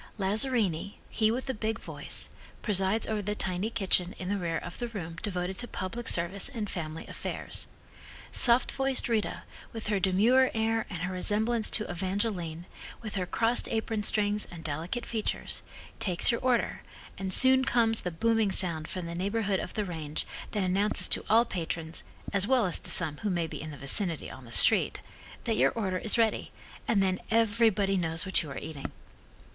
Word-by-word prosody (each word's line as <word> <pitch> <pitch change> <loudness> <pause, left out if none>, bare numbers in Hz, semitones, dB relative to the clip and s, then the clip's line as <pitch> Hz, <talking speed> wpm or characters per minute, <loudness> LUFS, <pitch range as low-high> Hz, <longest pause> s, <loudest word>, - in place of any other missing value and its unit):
Lazzarini, 200 -3 0 0.2
he 215 -1 +2
with 245 +3 -2
the 265 - -2
big 220 0 -2
voice, - - -2 0.3
presides 200 +1 +2
over 215 -1 -1
the 210 +1 -2
tiny 185 +2 -1
kitchen 185 -4 +1
in 185 - -5
the 205 - 0
rear 165 -2 -1
of 175 - -7
the 240 - -2
room 170 -8 -6
devoted 185 -2 -3
to 245 - -3
public 230 +5 -4
service 175 +3 +2
and 220 -5 -4
family 160 -4 -5
affairs. - - -3 0.6
Soft 240 0 +4
voiced 270 -1 0
Rita, 225 -3 -1 0.3
with 225 -2 -6
her 205 -2 +1
demure 215 +8 +4
air 225 0 0
and 180 -3 -5
her 185 +1 -2
resemblance 215 +5 0
to 215 - +2
Evangeline, 175 -2 -2 0.4
with 215 -2 -6
her 185 -2 -2
crossed 230 +5 +1
apron, 220 -1 -1
strings 210 0 +2
and 170 -2 -10
delicate 165 +10 -3
features, 220 -2 -2 0.4
takes 180 +2 +3
your 235 - -2
order, 255 -2 +1 0.4
and 190 -1 -3
soon 260 +6 +6
comes 225 -3 +3
the 180 - -2
booming 220 +4 +1
sound 165 -5 +1
from 185 -2 -5
the 170 - -5
neighborhood 200 +2 0
of - - -6
the 210 -2 -1
range, 160 -4 -3 0.2
that 205 -3 -1
announces 195 +3 +2
to - - 0
all 230 +2 +5
patrons, 165 -4 -4 0.3
as 200 0 +4
well 255 -3 +3
as 180 - +2
to - - -2
some 155 -4 +4
who 210 - -2
may 175 -3 0
be 160 - -7
in 155 - -6
the 145 - -8
vicinity 165 +4 +1
on 130 -1 -11
the 115 - -13
street, - - +4 0.4
that - - 0
your 130 +3 +5
order 190 -5 -1
is 220 - +1
ready, 225 -2 +1 0.4
and 200 -4 +3
then 185 -1 0
everybody 220 -3 +3
knows 165 -2 0
what 190 - +3
you 155 - -7
are 135 - -6
eating. 150 -3 -6
200 Hz, 185 wpm, -29 LUFS, 175-225 Hz, 0.6 s, soon